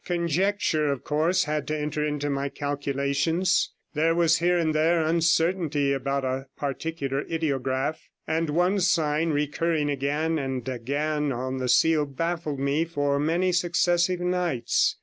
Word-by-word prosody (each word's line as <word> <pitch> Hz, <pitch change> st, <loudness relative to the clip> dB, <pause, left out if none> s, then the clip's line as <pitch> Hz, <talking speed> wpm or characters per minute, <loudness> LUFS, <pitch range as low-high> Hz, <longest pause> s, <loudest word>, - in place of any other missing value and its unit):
Conjucture, 170 Hz, -2 st, 0 dB
of 140 Hz, -, -4 dB
course, 160 Hz, +5 st, +1 dB
had 150 Hz, -1 st, -2 dB
to 155 Hz, -, -1 dB
enter 150 Hz, 0 st, -2 dB
into 145 Hz, -1 st, -2 dB
my 140 Hz, 0 st, -1 dB
calculations; 145 Hz, +5 st, 0 dB, 0.2 s
there 165 Hz, +2 st, +2 dB
was 170 Hz, -1 st, +3 dB
here 175 Hz, +1 st, +2 dB
and 160 Hz, -2 st, +1 dB
there 160 Hz, +1 st, +2 dB
uncertainty 165 Hz, -3 st, +1 dB
about 135 Hz, 0 st, -1 dB
a 130 Hz, +1 st, -3 dB
particular 140 Hz, 0 st, -3 dB
ideograph, 135 Hz, -3 st, -1 dB, 0.3 s
and 160 Hz, 0 st, -1 dB
one 180 Hz, +6 st, +2 dB
sign 165 Hz, -3 st, +1 dB
recurring 150 Hz, +1 st, 0 dB
again 150 Hz, +4 st, -1 dB
and 130 Hz, -2 st, -4 dB
again 145 Hz, +4 st, -1 dB
on 130 Hz, +1 st, -3 dB
the 130 Hz, -1 st, -2 dB
seal 150 Hz, +4 st, +3 dB
baffled 160 Hz, 0 st, -3 dB
me 140 Hz, +3 st, +1 dB
for 145 Hz, -4 st, -1 dB
many 170 Hz, +5 st, +1 dB
successive 175 Hz, 0 st, +1 dB
nights. 175 Hz, -9 st, +1 dB
150 Hz, 140 wpm, -26 LUFS, 140-170 Hz, 0.3 s, was